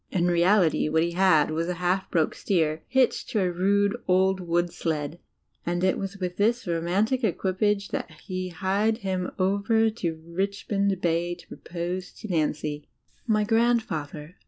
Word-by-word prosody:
In 175 -3 0
reality, 175 -2 +3
what 160 +1 +2
he 170 - -1
had 170 -4 +4
was 165 +2 -1
a 180 - -1
half 180 +2 0
broken 165 -3 +1
steer, 160 -5 0
hitched 260 -2 +1
to 215 - 0
a 185 -2 +1
rude, 200 +4 +2
old 190 +1 +3
wood 175 -1 0
sled, 160 -2 -3 0.4
and 175 +1 -1
it 185 - +3
was 195 0 -5
with 180 -2 -4
this 235 +4 +1
romantic 185 +9 0
equipage 200 +1 0
that - - -3 0.2
he 185 -2 -3
hied 195 +5 0
him 185 -1 -1
over 200 +4 +2
to 175 -7 -3
Richmond 195 +2 -1
Bay 170 +1 0
to 175 - -17
propose 180 +1 -5
xo 220 -3 -8
Nancy! 150 -2 -1 0.4
My 215 -2 +3
grandfather. 210 -9 0
185 Hz, 155 wpm, -26 LUFS, 170-200 Hz, 0.4 s, had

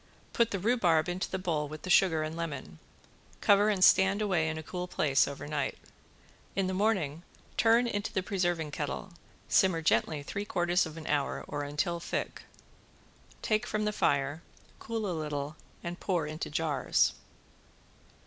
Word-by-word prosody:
Put 235 -1 +3
the 200 - -2
rhubarb 185 -6 +2
into 180 +1 -2
the 190 - -2
bowl 165 -5 -1
with 155 +1 -9
the 185 - -2
sugar 165 -5 +4
and 155 +1 -4
lemon, 140 - -5 0.6
cover 205 +1 +5
and 195 -3 +2
stand 190 +2 +6
away 180 -7 +1
in 160 - -3
a 160 - -6
cool 180 +3 -5
place 135 -6 +2
over 140 0 -6
night. 145 -1 -2 0.8
In 195 - +1
the 185 - -1
morning 185 -7 0 0.3
turn 230 +2 +4
into 205 -3 -2
the 190 - -1
preserving 175 -6 -1
kettle, 160 +6 -4 0.3
simmer 170 -4 +3
gently 155 -1 +1
three 200 +7 -4
quarters 175 -3 +1
of 160 0 -10
an 160 - -8
hour 145 -2 -1
or 145 - -3
until 150 +5 -1
thick, - - -4 1.0
take 215 -1 +1
from 215 0 -1
the 210 - 0
fire, 145 -3 +1 0.4
cool 225 -1 -3
a 185 - -1
little 150 -2 -3 0.3
and 175 +1 -5
pour 175 -5 0
into 155 +1 -5
jars. 150 -1 +1
175 Hz, 165 wpm, -30 LUFS, 150-195 Hz, 1.0 s, stand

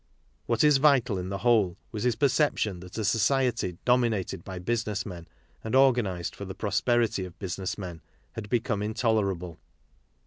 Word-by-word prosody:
What 115 +2 +2
is| 150 -2 +6
vital 135 -8 +3
in 90 +1 -5
the 100 - -3
whole 105 -4 +2
was 110 -3 -5
his 125 -3 +2
perception 130 - +1
that 90 +3 -10
a 110 - -1
society' 115 -3 +1
dominated 115 -8 +1
by 95 -1 -7
business 110 +1 -2
men 85 -4 -8 0.4
and 110 +3 -2
organized 120 -10 +2
for - - -7
the 95 - -7
pro 105 - -3
sperity 120 -5 +1
of 90 -1 -9
business 95 -1 -4
men 90 -5 -7 0.3
had 105 -2 -7
become 115 -3 0
intolerable. 105 -6 -1
105 Hz, 165 wpm, -27 LUFS, 95-120 Hz, 0.4 s, is|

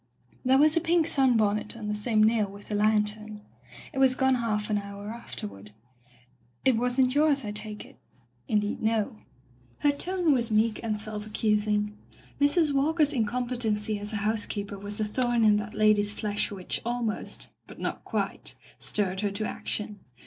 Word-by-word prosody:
There 260 +1 +4
was 305 +3 +5
a 335 - +3
pink 335 0 +3
sunbonnet 225 -6 +2
on 215 -2 -6
the 210 - -1
same 215 +1 +2
nail 215 -1 +3
with 200 +1 -13
the - - -3
lantern. 210 0 0 0.5
It 270 - -3
was 260 -1 +5
gone 265 0 +3
half 220 -4 0
an 205 - +2
hour 200 0 -8
afterward. 105 - -8 0.9
It 260 - +5
wasn't 250 +2 +2
yours, 290 -3 +3
I 205 - -3
take 210 0 -6
it? - - -18 0.3
'* 120 0 -40
"Indeed 210 -1 0
no." 220 -1 0 0.6
Her 290 - +4
tone 350 +2 +1
was 240 -3 +2
meek 215 0 +2
and 215 -2 -2
self, 210 0 -4
accusing. 210 -1 0 0.4
Mrs. 290 +1 +3
Walker's 300 +2 +2
incompetency 225 -3 0
as 205 +1 -3
a - - -4
house 215 0 +1
keeper 200 -1 -5
was 205 +1 -3
a 215 - +1
thorn 240 +2 +1
in 210 -1 +5
that 210 +1 -5
lady's 210 -1 +3
flesh 210 -1 -1
which 190 -3 -3
almost 235 -2 -3
— - - -45
^but - - -11
not - - -4
quite - - -2
— - - -25
stirred 190 -3 0
her 205 0 0
to 200 +2 -3
action. 210 -1 -3
215 Hz, 180 wpm, -27 LUFS, 210-250 Hz, 0.9 s, was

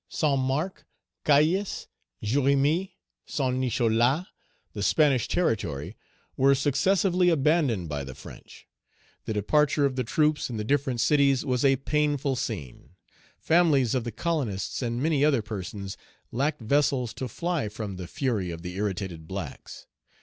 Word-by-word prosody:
Saint 140 +7 +1
Marc, 140 +8 -2 0.4
Cayes, 160 +7 +2 0.4
Jérémie, 140 - +2 0.3
Saint 130 -2 -1
Nicholas, 125 +4 +2 0.5
the 100 - -5
Spanish 135 +4 +3
territory, 100 - -1 0.4
were 135 +1 +4
successively 180 +6 +2
abandoned 145 - +2
by 75 -2 -3
the 65 -1 -8
French. - - -13 0.6
The 110 - -2
departure 145 +7 +2
of 135 -2 0
the 130 - 0
troops 150 +5 +1
in 115 - -4
the 105 - -2
different 130 0 0
cities 140 -1 +3
was 125 -2 0
a 135 -1 +5
painful 145 0 0
scene. 95 - -6 0.4
Families 155 -8 +3
of 130 -3 0
the 120 - -4
colonists 135 - -2
and 120 +1 -2
many 150 -3 +2
other 140 -7 +3
persons 100 -2 -6 0.3
lacked 145 +4 -1
vessels 130 0 +1
to 130 - -4
fly 170 -1 -2
from 105 -2 -6
the 90 -1 -6
fury 120 - -1
of 85 0 -7
the 90 +1 -6
irritated 95 -5 -3
blacks. 95 -6 -7
130 Hz, 140 wpm, -27 LUFS, 105-150 Hz, 0.6 s, a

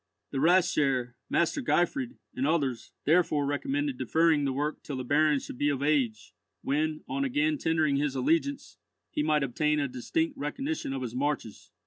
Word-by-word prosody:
The 135 - -2
Rathsherr, 145 -7 +3 0.2
Master 170 - +1
Gottfried, 250 +4 0 0.2
and 135 +2 -1
others, 140 -7 -1
therefore 155 -2 +3
recommended 270 - -1
deferring 160 -3 +3
the 135 - +1
work 145 +3 -2
till 145 - -6
the 130 - -3
Baron 150 +3 +3
should 125 - -9
be 145 - +2
of 140 -1 -1
age, 135 -7 0 0.3
when, 155 +2 -1
on 275 - -1
again 295 +3 +1
tendering 155 -3 +2
his 140 -1 0
allegiance, 165 - 0 0.3
he - - -1
might 150 -1 +2
obtain 150 +4 +1
a 140 - 0
distinct 285 - -2
recognition 280 - -3
of 135 -1 -3
his 120 -2 -5
marches. 135 -4 -3
150 Hz, 165 wpm, -28 LUFS, 140-180 Hz, 0.3 s, Rathsherr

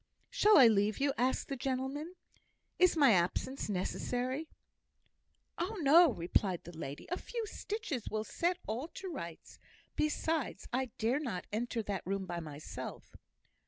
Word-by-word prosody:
"Shall 430 -4 +6
I 265 - +10
leave 210 -1 +4
you?" 280 0 +1
asked 255 +2 +1
the 275 - -3
gentleman. 270 +6 -3 0.6
"Is 365 -2 +5
my 280 -6 +7
absence 195 +8 0
necessary?" 250 - -2 1.1
"Oh, 390 +6 -2
no!" 320 +2 +7
replied 180 -1 0
the 175 0 -10
lady. 145 -2 -6
"A 360 - 0
few 465 -2 -4
stitches 410 - -4
will 215 0 -1
set 345 +9 0
all 235 +8 -3
to 385 - -5
rights. 170 - -8 0.4
Besides, 305 -1 -1
I 260 +1 +1
dare 235 +6 +1
not 225 -12 -4
enter 230 +1 -1
that 200 -3 -3
room 195 +1 -2
by 175 -1 -4
myself." 150 -2 -8
255 Hz, 145 wpm, -33 LUFS, 200-315 Hz, 1.1 s, I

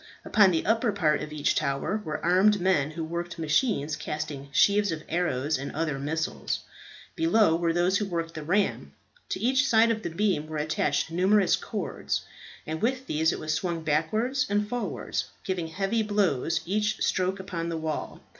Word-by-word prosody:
Upon 200 -3 +5
the 165 -3 0
upper 225 +1 +2
part 160 -7 +1
of 150 0 -6
each 150 -1 +1
tower 155 +8 -1
were 155 -2 -4
armed 195 +4 +4
men 175 -6 +2
who 160 +1 -5
worked 170 +2 -4
machines 155 - +1
casting 150 -3 -5
sheaves 205 +5 +4
of 155 -1 -4
arrows 155 -4 0
and 140 - -5
other 155 -3 -1
missiles. 160 +3 -2 0.5
Below 225 - +3
were 170 0 +1
those 175 +3 +2
who 210 - -2
worked 165 -2 -3
the 155 - -6
ram. 185 +7 0 0.4
To - - -2
each 265 +4 +2
side 230 -1 +5
of 220 -1 -2
the - - -3
beam 170 -3 0
were 155 0 -5
attached 150 0 0
numerous 190 +2 +3
cords, - - -3 0.4
and 160 0 -4
with 260 +3 0
these 160 -5 +1
it - - -3
was 155 0 -2
swung 170 0 -2
backwards 215 - 0
and 205 0 +1
forwards, 245 +2 -3 0.2
giving 180 -4 -2
heavy 195 +7 -1
blows 185 -7 +1
each 210 +4 0
stroke 185 +1 0
upon 170 -3 -4
the 165 - -2
wall. 160 -1 -4
170 Hz, 175 wpm, -27 LUFS, 155-210 Hz, 0.5 s, Upon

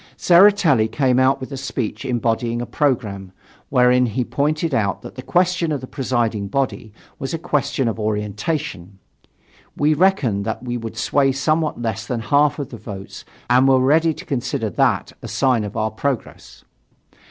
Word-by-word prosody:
Tseretelli 175 - +5
came 130 -3 +2
out 130 +1 +3
with 130 +2 -8
a 135 - -5
speech 130 -2 -4
embodying 120 -1 -1
a 120 - -3
programme, 105 -10 -1 0.4
wherein 125 -1 +4
he 120 +3 -1
pointed 150 +4 -1
out 100 -6 0
that - - -9
the 130 - -8
question 180 +2 +1
of 145 - -1
the 130 - -8
presiding 120 -6 -1
body 125 -1 -2 0.3
was 135 +4 -3
a - - -2
question 140 -4 -1
of 115 0 -2
orientation. 105 - -3 0.8
We 150 +1 +3
reckoned 150 - +2
that 110 +4 -4
we 120 -1 -3
would 115 -2 -6
sway 135 -1 +2
somewhat 155 +3 0
less 110 -1 -3
than 120 -2 -2
half 145 +4 +2
of 140 -4 -5
the 115 - -8
vote 100 -3 -9 0.2
and 125 +2 +4
were 135 -1 +5
ready 155 +5 +3
to - - -10
consider 120 -5 -2
that - - +1
a - - -7
sign 130 -5 +1
of 105 -1 -6
our 110 0 0
progress. 130 +3 -5
130 Hz, 170 wpm, -20 LUFS, 110-145 Hz, 0.8 s, Tseretelli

